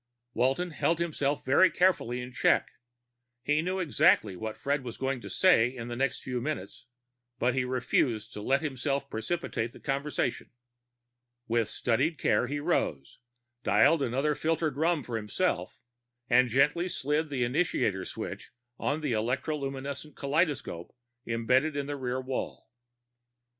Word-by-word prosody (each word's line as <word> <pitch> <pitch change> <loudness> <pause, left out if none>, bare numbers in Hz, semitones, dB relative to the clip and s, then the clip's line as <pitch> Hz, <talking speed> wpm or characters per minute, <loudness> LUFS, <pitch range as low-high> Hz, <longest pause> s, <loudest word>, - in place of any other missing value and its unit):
Walton 135 +9 +1
held 165 +1 +1
himself 150 -4 -1
very 145 +8 +6
carefully 150 -10 +1
in 125 +1 -7
check. - - +2 0.7
He 150 +3 +2
knew 185 +3 -2
exactly 140 - +3
what 110 +4 -5
Fred 140 0 -1
was 120 -2 -7
going 135 -1 -2
to - - -8
say 180 -12 +5
in 120 -2 -7
the 120 - -4
next 130 +1 -1
few 125 -2 -3
minutes, 150 -3 -5 0.5
but 125 +1 +1
he 130 0 0
refused 120 -3 0
to 105 - -6
let 135 +7 +1
himself 140 -1 -2
precipitate 120 -2 -2
the - - -13
conversation. 140 +1 -2 1.0
With 115 -2 +1
studied 130 +9 0
care - - +2
he 145 +1 -2
rose, 110 - -1 0.4
dialed 165 +3 +4
another 135 +4 +1
filtered 160 -1 0
rum 160 0 +1
for 120 -2 -3
himself, 105 - -2 0.5
and 125 0 +4
gently 150 +9 +2
slid 150 +1 -1
the 135 -3 -1
initiator 120 - 0
switch - - -6 0.3
on 145 +3 -1
the 150 -4 -1
electroluminescent 135 +4 -3
kaleidoscope 140 - -1 0.3
embedded 125 +6 +2
in 145 -1 -1
the 145 +1 -3
rear 130 -1 -2
wall. 130 -3 -5
135 Hz, 140 wpm, -29 LUFS, 120-150 Hz, 1.0 s, very